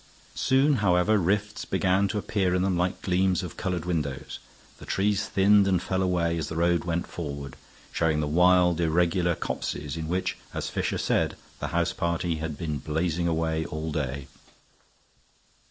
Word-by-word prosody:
Soon, 135 +2 +3
however, 100 +1 +3
rifts 105 +4 0
began 95 +1 +1
to 105 - -3
appear 95 -3 0
in 90 - +1
them 95 -1 +1
like 90 +1 -1
gleams 95 -1 +1
of 90 - -7
colored 90 -3 -3
windows; 75 -6 -3 0.4
the - - -10
trees 105 +1 +1
thinned 100 +1 +4
and 95 -2 +3
fell 95 +2 -1
away 85 -2 +1
as 75 - -3
the 80 - -5
road 85 +1 +2
went 85 0 -1
forward, 70 -5 -6 0.4
showing 80 -2 +1
the 75 - 0
wild, 90 +2 +4
irregular 85 +1 +2
copses 75 -2 -4
in 80 -1 -4
which, 90 +3 -1 0.2
as - - -3
Fisher - - -1
said, - - 0 0.2
the - - -3
house - - 0
party 85 -1 -1
had 80 -2 -4
been 75 -3 -3
blazing 80 +4 -1
away 80 -1 0
all 80 +1 -4
day. 65 -1 -3
85 Hz, 165 wpm, -27 LUFS, 80-95 Hz, 0.4 s, thinned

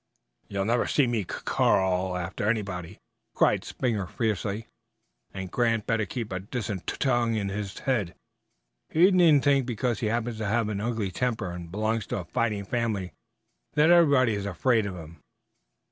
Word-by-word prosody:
"You'll 100 -1 -2
never 120 +2 +1
see 145 - +3
me 120 -4 0
cuc - - -7
crawling 95 -1 +2
after 95 +4 -2
anybody!" 95 -6 -3 0.4
cried - - +3
Springer 110 -7 -2
fiercely; 110 0 -2 0.7
"and 95 -1 -6
Grant 115 -3 +1
better 110 -2 0
keep 115 -2 -5
a 95 - -2
decent 100 -2 -5
tut - - -3
tongue 120 -3 +2
in 100 -2 -1
his 100 0 -5
head! 110 -10 -1 0.7
He 175 +5 +5
needn't 165 -6 +5
think 140 -3 +3
because 120 -1 -1
he 110 - -1
happens 115 0 -2
to 110 - -2
have 110 0 +1
an 100 -1 -3
ugly 110 -4 -2
temper 110 -3 -2
and 85 -1 -8
belongs 110 +2 -1
to - - -2
a 90 - -5
fighting 110 -3 -1
family 110 -5 -2 0.6
that 155 +3 +5
everybody 140 -9 +5
is 100 -1 -3
afraid 110 +4 +1
of 95 - -5
him. 80 -2 -11
110 Hz, 170 wpm, -27 LUFS, 95-120 Hz, 0.7 s, He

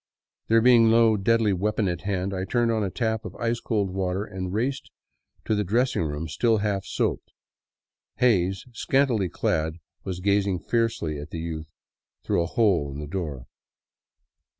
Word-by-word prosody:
There 115 0 +4
being 120 -1 +6
no 115 -1 +5
deadly 110 +1 +2
weapon 105 +2 0
at 85 -2 -2
hand, 95 -1 -2
I 95 -1 -2
turned 120 +4 +1
on 110 -2 0
a 100 - -1
tap 110 +1 -1
of - - -8
ice 115 0 -1
cold 105 -5 -1
water 95 +1 -1
and 95 -3 -5
raced 125 +7 -2 0.6
to - - +1
the 105 -1 +1
dressing 120 +5 +1
room 75 0 -3
still 110 +9 +2
half 100 -2 -1
soaped. - - -2 0.8
Hays, 95 -6 +2
scantily 120 -5 +1
clad, 80 0 -1 0.3
was 90 -2 -4
gazing 100 0 +1
fiercely 110 -9 -1
at 75 - -8
the - - -6
youth 80 -1 -5 0.6
through - - +1
a 85 - -1
hole 90 -9 +2
in 70 - -7
the 75 - -5
door. 75 -6 -5
100 Hz, 165 wpm, -25 LUFS, 90-115 Hz, 0.8 s, being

